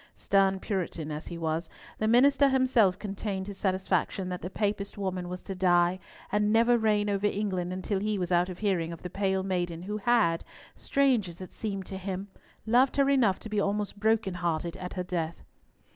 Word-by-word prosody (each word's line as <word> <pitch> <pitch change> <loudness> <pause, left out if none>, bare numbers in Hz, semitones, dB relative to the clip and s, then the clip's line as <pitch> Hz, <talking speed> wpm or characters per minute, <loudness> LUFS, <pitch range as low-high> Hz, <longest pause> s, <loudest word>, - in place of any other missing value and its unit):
Stern 195 -1 +2
Puritan 175 -6 -3
as 150 +2 -5
he 170 - -6
was, 160 +1 -2 0.3
the 215 - +1
minister 275 +4 +5
himself 255 -8 +3
contained 200 -1 -4
his 200 -1 -8
satisfaction 190 -1 0
that 180 -1 -4
the 180 - -4
Papist 205 0 -2
woman 185 -3 -3
was 180 0 -6
to 195 - -5
die 180 -1 +3 0.3
and 210 +1 +2
never 230 +2 +5
reign 215 -2 +2
over 200 0 +1
England 190 -4 -2
until 190 +2 -2
he 210 +1 -1
was 180 -1 -2
out 175 +1 +3
of 180 - -6
hearing 180 -5 0
of 170 - -9
the 180 - -6
pale 190 -1 0
maiden 175 -3 -2
who 210 +3 -3
had—strange 230 +3 +1
as 170 - -11
it 185 - -8
seemed 195 -4 -4
to 190 +1 -6
him—loved 205 +7 -1
her 275 0 +4
enough 230 -9 +3
to - - -7
be 210 -1 -1
almost 205 0 -1
broken 220 -2 +2
hearted 170 -1 -2
at 180 -1 -6
her 180 - -3
death. 170 -3 -3
195 Hz, 190 wpm, -28 LUFS, 180-210 Hz, 0.3 s, minister